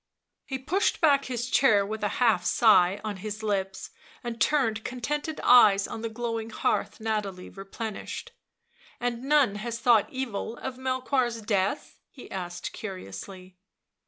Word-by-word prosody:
He 265 - -3
pushed 335 - 0
back 280 -4 +4
his 240 -1 -3
chair 215 -6 +4
with 215 +1 -5
a - - +3
half 225 -8 +3
sigh 190 -2 +4
on 210 -2 -4
his 215 +2 -6
lips, 195 -2 -2 0.3
and 235 -1 -5
turned 225 -7 +2
contented 295 +5 -3
eyes 205 -5 +6
on 225 - -6
the 230 - -3
glowing 230 -1 -4
hearth 230 - -1
Nathalie 210 -4 -3
replenished. 215 - -6 0.4
" - - -29
And 245 -1 -2
none 275 -6 +3
has 230 +2 -4
thought 230 -4 +4
evil 235 -3 -4
of 260 -1 -6
Melchoir's 255 -3 -1
death 200 +3 -1
?" - - -57
he 265 - -13
asked 175 -2 -5
curiously. 185 - -8
225 Hz, 150 wpm, -27 LUFS, 200-255 Hz, 0.4 s, eyes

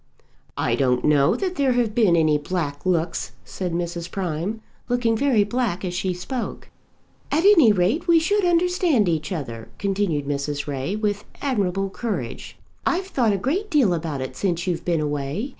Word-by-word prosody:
"I - - 0
don't 125 -2 +1
know 145 -2 +4
that 370 -3 -3
there 275 -3 +3
have 240 -3 +1
been 210 -7 +4
any 155 -2 +3
black 150 -1 -3
looks," 170 -2 -1
said 180 -2 -4
Mrs. 170 0 -3
Prime, 185 +3 -3 0.3
looking 240 -2 +2
very 235 -3 +3
black 205 -4 -1
as 180 - -3
she 185 +1 -1
spoke. 225 +8 -5 0.6
"At 315 +4 +2
any 330 - +7
rate 205 - +1
we 335 -1 +6
should 405 +5 +1
understand 350 - +2
each 160 -1 -1
other," 120 -10 -5
continued 195 -7 -1
Mrs. 145 0 -2
Ray, 140 +6 -3
with 210 -1 -2
admirable 195 -7 -1
courage. 230 +1 -5 0.3
"I've 365 +2 0
thought 240 - +2
a 200 - +1
great 340 - -1
deal 270 - +3
about 160 -5 -3
it 130 0 -5
since 175 -1 -1
you've 180 -3 -2
been 170 -3 0
away. 150 - -2
190 Hz, 170 wpm, -23 LUFS, 160-245 Hz, 0.6 s, any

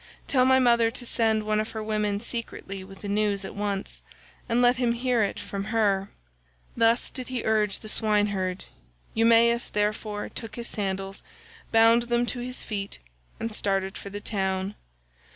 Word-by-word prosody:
Tell 255 -2 +3
my 260 0 +6
mother 235 -3 +4
to 245 +1 -6
send 220 -2 +1
one 215 0 +1
of 215 - -3
her 220 -1 -4
women 210 -1 0
secretly 220 -4 -5
with 195 0 -13
the 205 - -5
news 200 -1 0
at - - -7
once, 200 -1 -3 0.5
and 235 +1 +2
let 245 0 +5
him 245 -2 +2
hear 245 -1 +1
it 200 - -1
from 200 0 -5
her." 205 -3 +1 0.7
Thus 230 +1 +3
did 255 -3 -5
he 255 -2 -3
urge 215 -2 +2
the 215 - -11
swineherd; 205 -4 0 0.5
Eumaeus, 230 +1 +4
therefore, 210 0 -1
took 220 -2 -7
his 235 -1 -5
sandals, 195 -1 -3 0.5
bound 225 +1 +6
them 240 0 +2
to 245 - -2
his 250 +1 -3
feet, 200 -2 -4 0.4
and 225 -1 -3
started 195 -2 0
for 200 - -7
the 205 +1 -6
town. 190 -1 -1
215 Hz, 170 wpm, -26 LUFS, 200-235 Hz, 0.7 s, my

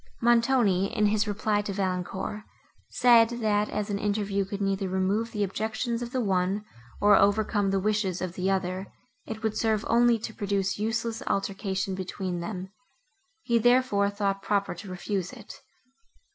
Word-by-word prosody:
Montoni, 230 -5 +3
in 210 - +3
his 210 +1 +2
reply 205 0 0
to 205 -1 -4
Valancourt, 190 +1 -3 0.5
said, 235 -2 +5
that 215 -3 0
as 210 0 -3
an 200 - -1
interview 200 -1 0
could 200 +1 -5
neither 195 -1 -1
remove 195 +5 0
the 210 -2 -1
objections 220 +4 -2
of 240 0 -5
the 255 - -1
one, 195 0 0 0.3
nor 205 0 +6
overcome 205 0 +2
the 195 0 +1
wishes 200 -2 0
of 185 -2 -4
the 185 +1 -1
other, 190 0 -1 0.4
it 220 0 -6
would 220 -1 0
serve 220 -1 0
only 235 0 +4
to 220 0 -6
produce 200 -2 -1
useless 225 +1 -2
altercation 195 -1 -1
between 185 -1 -4
them. 185 +1 -5 0.7
He, 235 -2 +2
therefore, 245 -4 +3
thought 200 -1 -1
proper 200 0 0
to 190 +3 -10
refuse 185 0 -3
it. 230 -5 -12
205 Hz, 160 wpm, -27 LUFS, 195-220 Hz, 0.7 s, nor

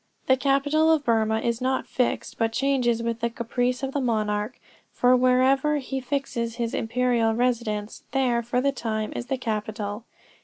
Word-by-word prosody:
The 260 - +5
capital 285 +4 +2
of 305 -3 +2
Burmah 220 -1 +2
is 235 0 -1
not 260 +1 0
fixed, 250 - -2
but 225 -1 +1
changes 245 -2 +1
with 230 0 -2
the 235 0 0
caprice 245 +2 -2
of 270 - -1
the 285 - 0
monarch, 215 -2 -1 0.3
for 250 +1 +4
wherever 260 +4 +3
he 270 -1 -3
fixes 245 -4 -2
his 235 -1 -2
imperial 235 -1 +1
residence, 230 -4 -1
there, 250 -3 +1
for 240 +2 -1
the 280 +1 +2
time, 220 -4 -3
is 240 - -4
the 265 0 -1
capital. 215 -2 -4
245 Hz, 165 wpm, -25 LUFS, 225-265 Hz, 0.3 s, The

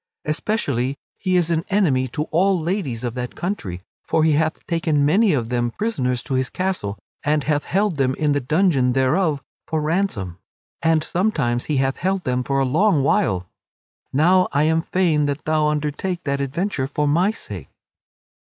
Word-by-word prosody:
Especially 145 - -1 0.2
he 185 -1 0
is 170 -2 +2
an 165 0 +1
enemy 150 -11 +2
to 150 +5 -3
all 185 +3 +3
ladies 160 - -2
of 120 -2 -2
that 125 0 -5
country, 100 - -4 0.2
for 160 - +1
he 160 - +4
hath 155 +2 0
taken 160 -4 +1
many 200 +8 +4
of 120 -7 0
them 120 -1 0
prisoners 125 - -1
to 135 - -4
his 130 0 0
castle 180 - -2 0.2
and 150 0 +1
hath 150 0 0
held 195 -3 0
them 130 -1 +1
in 150 -1 +1
the 145 - +2
dungeon 140 -2 +2
thereof 140 +3 +1 0.2
for 160 - -1
ransom; 150 - -1 0.4
and 160 -1 +2
sometimes 150 - 0
he 150 - 0
hath 135 0 +1
held 190 0 -1
them 125 0 0
for 135 +2 -1
a 135 - +2
long 155 +3 +3
while. 95 -9 +1 0.6
Now 180 +6 +4
I 145 +2 +2
am 160 +1 +2
fain 165 -4 +1
that 145 +1 -3
thou 155 -1 +2
undertake 150 +4 -2
that 140 -1 -1
adventure 140 +1 -2
for 150 +1 -1
my 170 +7 +3
sake." 220 - -7
150 Hz, 175 wpm, -21 LUFS, 130-175 Hz, 0.6 s, he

